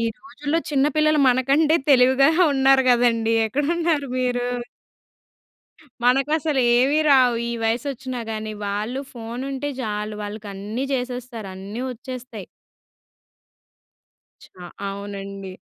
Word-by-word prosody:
ఈ - - 0
రోజుల్లో 285 +4 -3
చిన్న 280 -1 +2
పిల్లలు 305 -1 +3
మనకంటే 275 +5 +3
తెలివిగానె 275 +5 +5
ఉన్నారు 270 0 +4
కదండీ! 230 -2 +3
ఎక్కడున్నారు 295 +4 0
మీరు? 245 -1 0 1.6
మనకసలు 275 +3 +2 0.2
ఏమి 270 +5 +3
రావు. 255 -3 +6 0.2
ఈ - - -2
వయసు 225 +4 0
వచ్చిన 260 0 -7
గాని! 215 0 -4
వాళ్ళు 210 +6 -3
ఫోన్ 235 0 -7
ఉంటే 275 +2 -3
చాలు. 210 -2 -3
వాళ్ళకన్నీ 205 +3 -5
చేసేస్తారు! 245 -4 -5
అన్నీ 200 +5 -7
వచ్చేస్తాయి! 250 -4 -8 2.0
చా 180 - -14 0.2
అవునండి. 195 -1 -7
250 Hz, 105 wpm, -22 LUFS, 220-275 Hz, 2.0 s, రావు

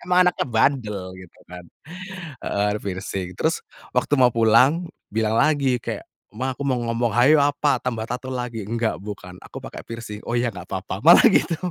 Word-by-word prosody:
emang 180 0 +4
anaknya - - -2
bandel 110 -6 0
gitu 90 - -16
kan, 90 0 -11 0.8
heeh, 105 +1 0
piercing 95 -1 -4
terus - - 0 0.3
waktu 145 - +1
mau 125 -2 +4
pulang 130 +9 +4 0.2
bilang 110 0 +1
lagi 140 -5 +2
kayak, - - -5 0.3
"Ma 130 +3 -2
aku 140 - -3
mau 130 -2 +1
ngomong," 115 -1 0
"hayo 135 +6 +5
apa 145 -1 +2
tambah 115 -3 -3
tato 125 +1 -4
lagi," 120 -4 -4
"nggak 115 0 -1
bukan 95 -2 -9
aku - - -10
pakai - - -9
piercing," 115 -2 -7
"oh 120 - -2
ya 120 0 +1
nggak 90 -4 -10
apa-apa" 95 0 -4
malah 170 - +9
gitu. 180 -1 +1
115 Hz, 175 wpm, -23 LUFS, 105-135 Hz, 0.8 s, malah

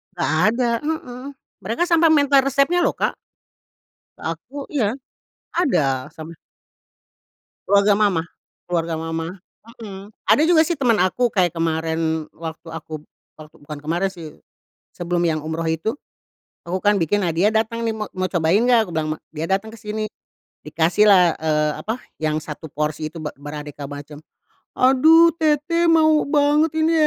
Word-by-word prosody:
Enggak 175 - -1 0.2
ada. 240 -1 0
Heeh. 260 -5 -5 0.3
Mereka 220 - -2
sampai 335 -1 +5
minta 285 -2 +4
resepnya 275 +5 +3
loh - - +1
Kak - - -1 1.0
ke - - -14
aku. 205 - -19 0.2
Iya, 230 -3 0 0.6
ada 135 - +1
sama. 160 0 -10 1.3
Keluarga 200 +1 +4
mamah 190 -6 +2 0.4
keluarga 170 -2 -2
mamah, 165 +1 -4 0.5
hmm. 195 -2 -9 0.2
Ada 300 - +4
juga 330 -2 +5
sih 345 +2 -1
teman 245 -4 +3
aku 240 +7 +1
kayak 185 -6 +1
kemarin 160 -1 -1
waktu 165 0 -8
aku, 155 -1 -7 0.3
bukan 155 -1 -12 0.2
bukan 150 0 -8
kemarin 170 +5 0
sih, 165 -5 -11 0.5
sebelum 175 0 -2
yang 165 -2 +1
umroh 160 +1 -3
itu. 165 +8 -2 0.7
Aku 180 +2 -3
kan 205 +1 +3
bikin, 190 +5 +1
nah - - +1
dia 175 +6 +2
datang 225 +1 -1
nih, 225 - 0
ma 215 - -3
"Mau 185 0 -1
cobain 175 +3 +2
enggak?" 235 -4 +3
Aku - - -8
bilang 155 -1 -1
ma - - -25
dia 155 0 -4
datang 195 +3 0
ke - - -10
sini 215 0 -4 0.6
dikasihlah, 175 +3 +4
eee, 150 -1 +1
apa, 225 +3 -3 0.2
yang 155 0 0
1 155 +1 -8
porsi 150 +1 -3
itu 165 - -10
be 150 - -3
beraneka 145 0 -7
macam, 145 +1 -9 0.6
"Aduh 315 +6 +6
teteh 315 +2 +1
mau 315 -2 +4
banget 295 +2 +3
ini, 320 +1 +2
185 Hz, 155 wpm, -21 LUFS, 160-250 Hz, 1.3 s, Aduh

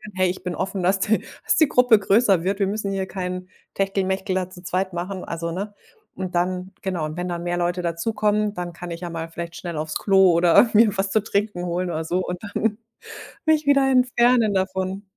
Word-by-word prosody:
„Hey, 185 -1 +2
ich 185 +1 -5
bin 180 -2 -3
offen, 190 0 -3
dass 190 +2 +2
die 220 +2 +2 0.3
dass - - +3
die 315 - +5
Gruppe 250 -4 +5
größer 195 -3 +3
wird.“ 195 +2 -1
Wir 195 - +2
müssen 200 0 -2
hier 190 -1 -2
keinen 185 -1 -5 0.2
Techtelmechtel 195 -1 -1
da 185 -1 -1
zu 180 -1 -12
zweit 185 +1 -2
machen, 180 +2 -4
also 170 0 -4
ne? 200 +4 -5 0.4
Und 185 -1 -5
dann 180 +1 -1
genau, 180 -5 -2
und 155 +2 -6
wenn 180 0 -3
dann 170 -1 -4
mehr 175 0 -1
Leute 175 +1 -1
dazukommen, 210 +4 0
dann 175 -2 -5
kann 175 +1 -8
ich 170 +1 -6
ja 175 - -4
mal 165 -1 -5
vielleicht 170 0 -7
schnell 170 -3 -6
aufs 155 0 -2
Klo, 190 -2 +5
oder 170 +7 +5
mir 215 -1 +5
was 195 0 0
zu 220 - +3
trinken 205 -4 -1
holen, 180 +1 -2
oder 160 -1 -2
so 175 +3 -1
und 180 0 -4
dann 210 +1 -1 0.7
mich 310 -1 +3
wieder 275 -1 +4
entfernen 245 -3 +3
davon. 190 0 -2
190 Hz, 215 wpm, -23 LUFS, 175-205 Hz, 0.7 s, die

